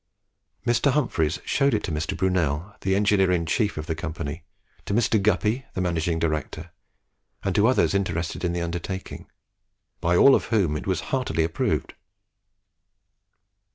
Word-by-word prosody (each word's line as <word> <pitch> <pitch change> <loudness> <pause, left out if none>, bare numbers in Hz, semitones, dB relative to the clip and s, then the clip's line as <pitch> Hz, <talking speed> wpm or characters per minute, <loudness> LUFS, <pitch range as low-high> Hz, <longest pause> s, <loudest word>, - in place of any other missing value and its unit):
Mr. 120 +3 +2
Humphries 90 - 0
showed 140 -3 +2
it 105 - -2
to 90 - -3
Mr. 80 +1 -2
Brunel, 90 0 0
the 95 0 +1
engineer 100 -1 +3
inchief 90 +4 0
of 75 - -4
the 80 - -2
company, 80 0 -5 0.4
to 100 - 0
Mr. 110 -2 +2
Guppy, 110 +4 +1
the - - -2
managing 85 -1 0
director, 80 +1 -3 0.7
and 95 - 0
to 105 +3 +4
others 130 -4 +3
interested 85 -3 -2
in 90 - +1
the 85 0 -2
undertaking, 90 +3 -5 0.7
by 85 +1 +1
all 140 - +7
of - - +2
whom 95 -10 +1
it 75 - -5
was 95 - 0
heartily 80 - 0
approved. 80 +1 -1
90 Hz, 150 wpm, -25 LUFS, 80-105 Hz, 0.7 s, all